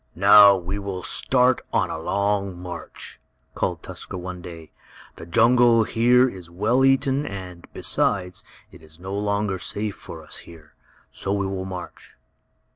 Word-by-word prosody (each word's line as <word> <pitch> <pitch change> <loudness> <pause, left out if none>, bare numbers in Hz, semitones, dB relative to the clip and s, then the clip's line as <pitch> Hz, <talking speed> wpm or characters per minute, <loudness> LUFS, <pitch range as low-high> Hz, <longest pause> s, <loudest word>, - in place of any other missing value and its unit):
"Now 100 +2 +8
we 95 +2 -4
will 95 -2 -5
start 125 0 +2
on - - 0
a - - -4
long 100 +1 -1
march!" 90 -2 -8 0.3
called - - -3
Tusker - - -7
one 90 0 -7
day. 80 -3 -11 0.5
"The 80 - -10
jungle 115 +3 +4
here 125 +3 +3
is 90 -7 -8
well 110 +9 +1
eaten, 135 +1 +2
and, 90 -7 -8
besides, 90 -3 -1 0.3
it - - -15
is 80 +1 -15
no 95 +2 -7
longer 100 -1 -1
safe 105 +2 -3
for 80 -1 -11
us 75 - -7
here. 80 -3 -15 0.4
So 100 - -4
we 100 -1 -1
will 95 -1 -4
march." 90 -2 -9
100 Hz, 150 wpm, -23 LUFS, 90-110 Hz, 0.5 s, Now